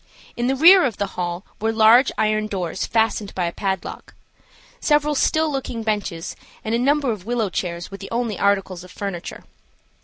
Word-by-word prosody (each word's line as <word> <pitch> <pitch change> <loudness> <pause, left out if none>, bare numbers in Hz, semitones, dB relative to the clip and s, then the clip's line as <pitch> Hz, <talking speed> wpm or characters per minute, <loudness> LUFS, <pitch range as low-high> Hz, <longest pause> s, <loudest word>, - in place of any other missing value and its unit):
In 240 +1 -1
the 265 - +1
rear 350 +6 +8
of 235 -6 -1
the 200 - -2
hall 175 +1 -4
were 225 +1 0
large 225 +4 +5
iron 215 0 +1
doors 185 -3 -3
fastened 220 -2 0
by 180 - 0
a 170 - -2
padlock. 190 +1 -4 0.6
Several 300 -4 +2
still 315 +2 +1
looking 255 -4 -4
benches 205 -6 -3 0.3
and 220 - -1
a 230 - +2
number 280 0 +2
of 210 -2 -7
willow 230 -5 -1
chairs 175 -1 -4
were 195 - -7
the 195 - -9
only 230 -3 -2
articles 195 -3 0
of 185 - -13
furniture. 190 -2 -6
215 Hz, 180 wpm, -22 LUFS, 190-245 Hz, 0.6 s, rear